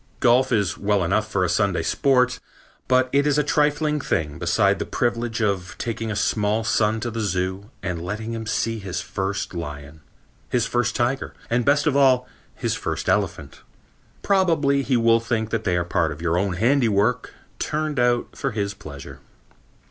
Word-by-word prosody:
Golf 125 +3 +4
is 100 -6 +1
well 100 -2 +1
enough 105 +5 0
for 100 -3 0
a - - +2
Sunday 90 -1 +1
sport, 125 +4 +2 0.5
but 130 0 +3
it 140 +1 +3
is 145 -1 +2
a 150 - +3
trifling 150 +1 +1
thing 80 - -2
beside 100 +3 +2
the - - -2
privilege 120 -1 -1
of 95 -3 -1
taking 115 -1 -3
a 105 - -2
small 105 +1 +1
son 110 -1 +1
to 120 +1 -3
the 115 - -4
zoo 95 0 -2
and 90 -2 -3
letting 105 +6 -4
him 110 -1 -5
see 115 +1 -1
his 95 -3 -4
first 95 +1 -3
lion, 75 -2 -7 0.5
his 120 -2 +1
first 120 -1 0
tiger 125 +2 -1 0.2
and, 120 0 +1
best 145 +1 +3
of 150 -3 +2
all, 130 -3 +4 0.3
his - - -1
first - - -3
elephant. - - -1 0.6
Probably 165 -8 +2
he 130 -2 +1
will 115 0 +4
think 115 -1 -2
that 115 -1 -2
they 90 -2 +1
are 85 - 0
part 85 -2 0
of 70 - -7
your 85 0 0
own 95 +1 0
handiwork 115 +1 +1 0.2
turned 150 -2 -2
out 120 0 +1
for - - -2
his 100 -1 -2
pleasure. 70 -7 -10
110 Hz, 180 wpm, -23 LUFS, 95-125 Hz, 0.6 s, Golf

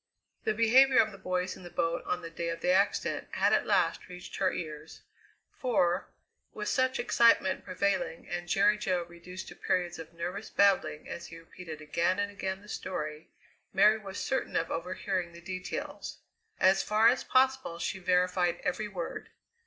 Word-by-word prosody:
The 215 - +1
behaviour 255 +4 +6
of 220 - +5
the 195 - -12
boys 185 0 -2
in - - -13
the 175 - -9
boat 170 -1 -1
on 180 -1 -1
the 165 - -7
day 170 0 -3
of 165 - -4
the 180 - +2
accident 195 +2 +1
had - - +3
at - - +2
last - - +1
reached 180 0 -9
her 190 -2 +2
ears, 155 -1 -7 0.6
for, 190 - +1 0.5
with - - -3
such 260 -1 +1
excitement 230 -5 +3
prevailing 190 -2 -1
and 175 0 -4
Jerry 210 +2 +4
Jo 180 -3 0
reduced 175 +2 -10
to - - -11
periods 175 -2 -1
of 165 0 -9
nervous 180 +5 -5
babbling 200 -6 +2
as 170 - -6
he 165 - -10
repeated 165 -1 -10
again 170 +4 +1
and 205 0 -1
again 190 -1 -4
the - - -15
story, 155 -7 -5 0.4
Mary 210 +3 +5
was 200 -2 -8
certain 265 -2 -2
of 165 - 0
overhearing 180 +1 -2
the 170 - -11
details. 185 +1 -5 0.4
As 190 +1 +5
far 215 +2 +4
as 245 +2 +3
possible 260 -8 +2
she 180 +2 -3
verified 180 -1 +2
every 195 +4 -1
word. 180 -5 -6
185 Hz, 175 wpm, -30 LUFS, 170-205 Hz, 0.6 s, behaviour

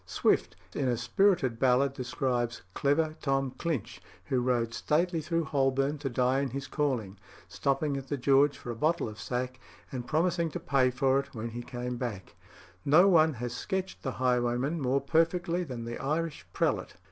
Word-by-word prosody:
Swift, - - +1 0.2
in 135 - -1
a 120 -2 +1
spirited 125 - +2
ballad 130 +1 +3
describes 120 -2 -2
"clever 155 +2 +1
Tom 135 -2 0
Clinch," 140 - -3 0.2
who 130 -3 +1
rode 120 -2 0
"stately 165 +5 +1
through 165 +2 0
Holborn 135 0 +1
to 135 -1 -2
die 125 +2 +2
in 140 -1 -1
his 135 +2 -5
calling," 120 -12 -2 0.3
stopping 140 +1 0
at 135 -1 -5
the 145 - -2
George 140 +2 +4
for 120 - -6
a - - -5
bottle 155 +7 +1
of 110 0 -9
sack, 125 +1 -3 0.3
and 125 -2 -5
promising 170 +1 +1
to - - -5
pay 130 -2 +2
for 135 +1 +2
it 140 - -7
"when 115 +1 -4
he 120 +1 -6
came 125 0 -5
back." 115 -7 -5 0.5
No 160 +7 +6
one 160 -4 +5
has 120 0 -4
sketched 190 0 -3
the 130 - -3
highwayman 125 +4 0
more 135 +1 +1
perfectly 165 +4 +1
than 125 -7 -6
the 120 0 -5
Irish 155 +3 -2
prelate. - - -1
135 Hz, 175 wpm, -29 LUFS, 125-155 Hz, 0.5 s, No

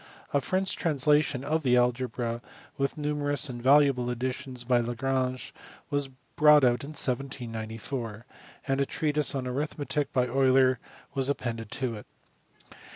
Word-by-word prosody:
A. 140 - +3
French 190 +5 0
translation 150 -3 +2
of 155 +3 0
the 125 -4 +3
algebra, 120 -1 0 0.3
with 140 +2 -1
numerous 145 -1 0
and 120 -1 -6
valuable 135 -2 +4
additions 125 +1 -4
by 120 0 +2
Jjagrange, 130 +2 -2 0.4
was 145 -1 +1 0.3
brought 150 -1 +6
out 120 -1 +3
in 140 - -7
1794; 115 -3 -2 0.4
and 135 0 +1
a 140 - +1
treatise 150 -2 0
on 130 -2 -2
arithmetic 145 +2 -2
by 125 -2 +2
Euler 130 0 +3 0.3
was 135 -1 0
appended 115 -5 -3
to 130 -3 -2
it. 105 - -12
130 Hz, 135 wpm, -28 LUFS, 125-145 Hz, 0.4 s, brought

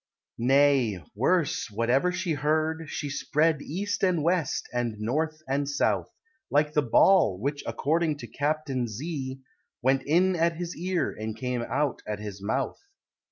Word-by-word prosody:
Nay, 130 -4 +3
worse, 145 - +1
whatever 120 - +1
she 180 -2 -1
heard, 155 +2 0
she 145 - -3
spread 145 +2 +1
East 200 +9 -3
and 180 -5 +2
West, 170 -3 0
and 120 -2 -1
North 155 +8 -2
and 140 +1 0
South, 145 - +1 0.4
Like 150 +1 +2
the 150 - +3
ball 120 - +4
which, 145 +5 -2
according 155 +1 0
to - - -8
Captain 145 -4 -1
Z, 135 +3 -5 0.4
Went 135 +1 +3
in 180 +7 +3
at 165 0 +2
his 175 +1 -5
ear, 180 -1 -1
and 110 0 -5
came 125 0 -2
out 135 +3 -1
at 105 -1 -2
his 105 -2 -7
mouth. 130 +7 -2
145 Hz, 150 wpm, -27 LUFS, 125-160 Hz, 0.4 s, ball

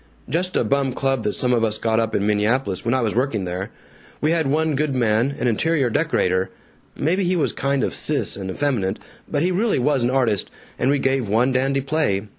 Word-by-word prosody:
"Just 180 +7 -1
a - - +3
bum 135 +3 0
club 135 -1 0
that 105 - 0
some 125 -1 +1
of 115 -2 +2
us 110 -1 +1
got 110 0 +1
up 115 -1 -1
in 100 - +1
Minneapolis 105 0 0
when 120 +2 +1
I 130 - +1
was 110 -3 0
working 120 -6 0
there. 90 +2 -4 0.5
We 155 - +1
had 165 -3 +1
one 155 +2 +1
good 145 -1 0
man, 120 +3 +1
an - - -2
interior 130 +2 +1
decorator 95 -2 +1 0.5
maybe 180 +7 0
he 180 +1 +1
was 165 - 0
kind 140 -1 0
of - - -1
sis - - 0
and 95 -1 -6
effeminate, 105 -4 -1 0.3
but 145 0 -1
he 180 - +1
really 210 +5 +1
was 135 +1 +1
an 120 - +2
artist, 125 -6 +1 0.3
and 130 - +2
we 145 - +3
gave 135 -5 0
one 120 +5 +2
dandy 135 +2 +1
play. 135 -9 0
130 Hz, 220 wpm, -22 LUFS, 110-145 Hz, 0.5 s, a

